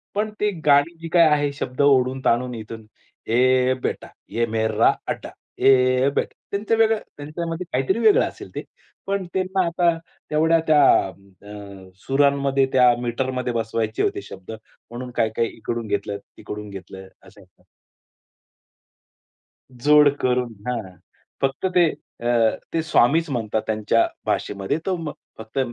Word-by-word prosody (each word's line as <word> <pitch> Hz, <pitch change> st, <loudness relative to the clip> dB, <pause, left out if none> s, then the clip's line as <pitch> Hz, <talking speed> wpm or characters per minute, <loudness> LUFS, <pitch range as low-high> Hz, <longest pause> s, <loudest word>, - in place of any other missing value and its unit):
पण 215 Hz, +1 st, 0 dB
ती 210 Hz, -, +2 dB, 0.2 s
गाणी 145 Hz, +3 st, +4 dB
जी 165 Hz, -, -5 dB
काही 170 Hz, -2 st, +7 dB
आहे 145 Hz, -1 st, +2 dB
शब्द 130 Hz, -1 st, -4 dB
ओढून-ताणून 130 Hz, -2 st, +2 dB
इथून 110 Hz, 0 st, -9 dB, 0.4 s
ये 130 Hz, +2 st, +3 dB
बेटा, -, -, -3 dB, 0.2 s
ये 115 Hz, 0 st, 0 dB
मेरा 110 Hz, 0 st, +3 dB
अड्डा, -, -, -4 dB, 0.3 s
ये 130 Hz, 0 st, +4 dB
बेटा. -, -, -1 dB, 0.2 s
त्यांचं 205 Hz, +3 st, 0 dB
वेगळं 225 Hz, -1 st, +3 dB, 0.2 s
त्यांच्यामध्ये 165 Hz, +4 st, -5 dB
काहीतरी 135 Hz, -, +1 dB
वेगळं 220 Hz, -3 st, +5 dB
असेल -, -, -10 dB
ते. -, -, -4 dB, 0.4 s
पण 195 Hz, -1 st, -1 dB
त्यांना 190 Hz, 0 st, 0 dB
आता 170 Hz, 0 st, +1 dB, 0.3 s
तेवढ्या 160 Hz, +2 st, +3 dB
त्या 155 Hz, -2 st, +5 dB, 0.3 s
अ, 100 Hz, 0 st, -12 dB, 0.2 s
सुरांमध्ये 140 Hz, 0 st, +2 dB
त्या 125 Hz, -2 st, +6 dB
मीटरमध्ये 125 Hz, +1 st, -2 dB
बसवायचे 110 Hz, -1 st, -1 dB
होते -, -, -1 dB
शब्द 95 Hz, +3 st, -11 dB
म्हणून 120 Hz, +3 st, -10 dB
काही-काही 110 Hz, +1 st, 0 dB
इकडून 115 Hz, 0 st, -4 dB
घेतलं, 100 Hz, 0 st, -2 dB, 0.2 s
तिकडून 105 Hz, 0 st, -7 dB
घेतलं 95 Hz, -1 st, -10 dB, 0.2 s
असं. -, -, -17 dB, 2.3 s
जोड 145 Hz, +3 st, +5 dB
करून, 125 Hz, -2 st, 0 dB
हां. 105 Hz, -7 st, -4 dB, 0.4 s
फक्त 135 Hz, +5 st, -1 dB
ते 175 Hz, -2 st, +5 dB, 0.3 s
अ, -, -, -5 dB, 0.5 s
ते 165 Hz, -, +1 dB
स्वामीच 155 Hz, +2 st, +3 dB
म्हणतात 110 Hz, -4 st, -1 dB
त्यांच्या 110 Hz, +1 st, +2 dB, 0.2 s
भाषेमध्ये 100 Hz, +8 st, -1 dB
तो 190 Hz, -1 st, 0 dB
म 160 Hz, -3 st, -5 dB, 0.3 s
फक्त 110 Hz, +4 st, -6 dB
130 Hz, 130 wpm, -22 LUFS, 110-155 Hz, 2.3 s, काही